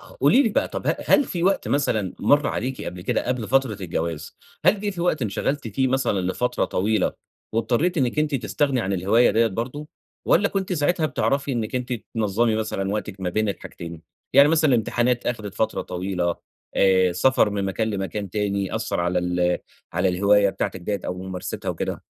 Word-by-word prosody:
قولي 285 - +3
لي 240 - +2
بقى، 210 - 0
طب - - -5
ه - - +2
هل 285 - +5
في 175 -8 -4
وقت 195 +2 +1
مثلًا 110 -9 0
مَر 145 0 +4
عليكِ 130 +3 -3
قبل 90 - -6
كده - - -1
قبل 125 -3 -2
فترة 135 -5 +2
الجواز، 85 -3 -4 0.3
هل 210 - +4
جِه 205 0 -1
في 185 -3 -6
وقت 170 -5 +1
انشغلتِ 115 +4 -2
فيه 130 +5 0
مثلًا 130 -6 +1
لفترة 125 +7 0
طويلة 105 +1 0 0.4
واضطريتِ 120 - +1
إنِك 130 +2 0
أنتِ 150 -1 +1
تستغني 135 0 0
عن 100 -3 -2
الهواية 100 +6 +3
دِيَّة 115 +1 +3
برضه، 120 +8 -4 0.4
والّا 200 +4 +3
كنتِ 195 -2 -2
ساعتها 160 0 +1
بتعرفي 140 -1 0
إنِك 115 -2 -2
أنتِ 125 0 -2 0.2
تنظمي 110 +1 +1
مثلًا 95 -3 -2
وقتِك 105 -2 -4
ما 90 -1 -1
بين 110 +3 0
الحاجتين؟ 85 -4 -7 0.3
يعني 140 +1 +7
مثلًا 155 -1 +3
الامتحانات 120 0 +1
أخدت 110 -5 -3
فترة 110 - -1
طويلة، 90 -1 -2 0.4
آآ 95 -2 +4
سفر 130 +2 +3
من 100 -1 -2
مكان 110 +3 -1
لمكان 100 0 -4
تاني 100 -1 -1
أثّر - - -1
على 90 +1 +1
ال 90 0 +1 0.3
على 90 +2 +1
الهواية 100 +2 +4
بتاعتِك 95 - -3
دِيَّة 100 +2 -2
أو - - -2
ممارستها 95 -1 -5
وكده؟ - - -3
110 Hz, 180 wpm, -23 LUFS, 95-135 Hz, 0.4 s, يعني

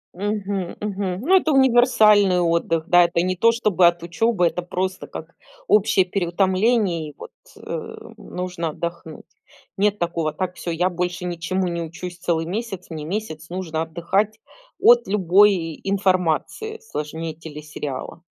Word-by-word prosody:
Мгм, 200 -2 -3
мгм. 195 -3 -3
Ну, 380 - +6
это 320 -4 +1
универсальный 230 -8 +5
отдых, 165 -1 +1
да. 175 -1 +6
Это 170 0 +1
не 185 +1 0
то 230 +6 +4
чтобы 215 -6 +2
от 170 0 +3
учебы, 180 +2 +1
это 180 - -2
просто 185 +1 -3
как - - -9 0.3
общее 200 -2 +4
переутомление, 185 -1 +1
и 150 - -13
вот, - - -10 0.3
э, - - -6 0.2
нужно 180 -2 -4
отдохнуть. 170 0 -6 0.5
Нет 205 +1 +1
такого: 170 -2 -1
"Так, 185 +1 -4
всё, 170 - -5
я 175 +3 +1
больше 180 0 -3
ничему 180 +2 -2
не 170 -1 -3
учусь 175 +2 -7
целый 165 -2 -1
месяц, 195 0 -5
мне 160 -3 -6
месяц 160 -3 -5
нужно 170 -3 -3
отдыхать 175 +6 -1 0.4
от 240 0 +6
любой 190 -3 +3
информации 195 - 0
сложнее 160 - -5
телесериала". 150 -1 -7
180 Hz, 140 wpm, -22 LUFS, 170-205 Hz, 0.5 s, Ну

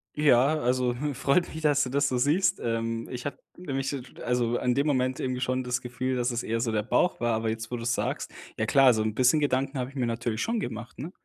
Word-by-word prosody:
Ja, 150 0 +4
also, 125 -1 +1
hm, 145 0 -2
freut 140 +7 +2
mich, 160 - -6
dass 145 -2 +3
du 125 - -3
das 140 +2 +1
so 130 - 0
siehst. 155 +9 +2
Ähm, 115 0 -2
ich 125 -1 -6
habe 145 - -4 0.2
nämlich 135 -6 -3
se 140 -2 -3 0.2
also, 120 -1 +1
in 125 - +1
dem 140 +4 +1
Moment 130 -2 +1
irgendwie 130 -1 -2
schon 130 0 -1
das 125 0 -1
Gefühl, 130 +1 -3
dass 125 0 0
es 120 0 -2
eher 115 0 -2
so 115 -1 0
der 105 -1 +1
Bauch 175 +9 +1
war, 120 -1 +1
aber 110 0 -1
jetzt, 110 0 -4
wo 120 - -2
du 115 - -6
es 120 0 +1
sagst, - - -2 0.3
ja, 110 - 0
klar, 135 +2 +6
so 110 -1 0
'n 110 0 -1
bisschen 130 +6 +4
Gedanken 135 -1 0
habe 130 0 -3
ich - - -20
mir 125 -3 0
natürlich 115 -1 -2
schon 230 0 0
gemacht, 120 - -6
ne? 155 +7 -6
125 Hz, 260 wpm, -27 LUFS, 120-140 Hz, 0.3 s, klar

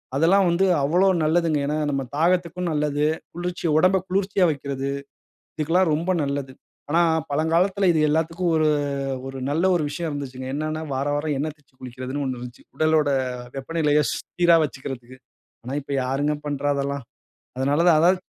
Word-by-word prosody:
அதெல்லாம் 180 +6 +4
வந்து 170 +3 +2 0.2
அவ்வளோ 175 +7 +3 0.2
நல்லதுங்க. 160 -1 +2
ஏன்னா, 150 +1 -1
நம்ம 135 -1 -1 0.2
தாகத்துக்கும் 175 +1 +1
நல்லது. 150 -1 0 0.3
குளிர்ச்சி 175 +1 -4
உடம்பை 185 +3 +4
குளிர்ச்சியா 195 0 +2
வைக்கிறது. 140 -2 -4 0.7
இதுக்கெல்லாம் 165 +3 +2
ரொம்ப 170 +4 -1
நல்லது. 140 -1 -3 0.4
ஆனா 170 +2 +4 0.3
பழங்காலத்தில 170 +6 +2
இது 160 -2 +3
எல்லாத்துக்கும் 165 +3 0
ஒரு 155 -1 +3 0.6
ஒரு 135 0 -6
நல்ல 160 +5 0
ஒரு 170 - +1
விஷயம் 165 +3 -4
இருந்ததுச்சுங்க. 130 -3 -6
என்னன்னா 155 +2 -3
வாரா 140 +2 -1
வாரம் 150 0 -1
எண்ண 150 +3 -1
தேய்ச்சி 145 -3 -33
குளிக்கிறதுன்னு 130 +3 -5
ஒண்ணு 130 -1 -2
இருந்துச்சு. 120 +1 -10
உடலோட 155 -2 +2 0.4
வெப்பநிலைய 150 +1 +1
சீரா 175 -1 +2
வச்சுக்கிறதுக்கு. 130 -3 -7 0.5
ஆனா 130 +3 -4
இப்ப 140 - -8
யாருங்க 140 +4 0
பண்ணுறா 145 0 -1
அதெல்லாம். 140 -1 -3 0.5
அதனால 145 +5 +2
தான், 160 -3 +6
அதாவது 180 +3 +4
150 Hz, 145 wpm, -23 LUFS, 140-170 Hz, 0.7 s, தான்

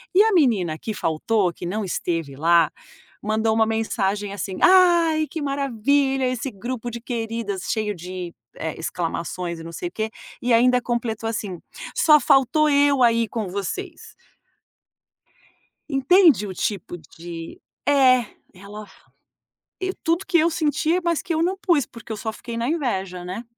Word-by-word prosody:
E 405 - +8
a 445 - +2
menina 215 - +2
que 215 +6 -5
faltou, 180 +3 0
que - - -8
não 210 +5 -2
esteve 165 -5 -3
lá, 165 0 +4 0.5
mandou 220 +1 +1
uma 220 0 +3
mensagem 205 -2 -1
assim, 195 -1 -5
"Ai 340 -4 +5
que 320 - -5
maravilha, 275 0 +1
esse 255 +2 -3
grupo 240 +4 -5
de 235 0 -7
queridas!" 225 -5 -4
cheio 215 -2 -1
de, 180 0 -7 0.2
eh, 160 -1 -4
exclamações 170 +1 -4
e - - -9
não 165 0 -9
sei 175 - -4
o - - -28
quê, 220 0 -3 0.3
e 245 -1 +1
ainda 250 +2 +4
completou 235 -2 -2
assim: 200 -5 -4 0.4
"Só 305 -1 +6
faltou 270 +3 +3
eu 285 -2 +4
aí 230 -1 +3
com 215 -3 -4
vocês". 320 - -5 1.8
Entende 280 - +4
o 190 - -6
tipo 185 -2 -3
de 165 +1 -10 0.3
é, 255 -4 +5 0.3
ela 205 +3 -10 0.9
e 375 0 -2
tudo 335 +3 0
que 345 - +3
eu 330 +1 +4
sentia, 320 +2 0
mas 340 -2 0
que 340 - -3
eu 320 - 0
não 370 +3 0
pus, 340 - +2
porque 230 -1 -11
eu 220 - -3
só 220 +1 -3
fiquei 235 +1 -8
na 230 +1 -1
inveja, 195 - -2
né. 185 +7 -5
230 Hz, 160 wpm, -23 LUFS, 190-285 Hz, 1.8 s, E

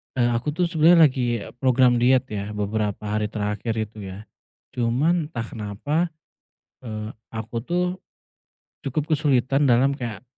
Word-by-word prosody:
eee, 120 -1 +2
aku 120 +5 -2
tuh 180 - +1
sebenernya 165 -2 +6
lagi 120 -4 -1 0.2
program 125 -1 +4
diet, 130 +1 +4
ya, 105 0 -4
beberapa 105 0 -2
hari 105 0 -1
terakhir 105 +2 -3
itu, 110 0 -4 0.2
ya, 105 - -10 0.5
cuman 145 +8 +1
entah 120 -7 -4
kenapa, 110 +6 -5 0.9
eee, 110 -2 -6 0.2
aku 115 +1 -5
tuh 175 +3 0 1.0
cukup 150 +4 -3
kesulitan 140 -2 +2
dalam 130 +3 +4
kayak 120 -6 -5
120 Hz, 135 wpm, -24 LUFS, 110-140 Hz, 1.0 s, sebenernya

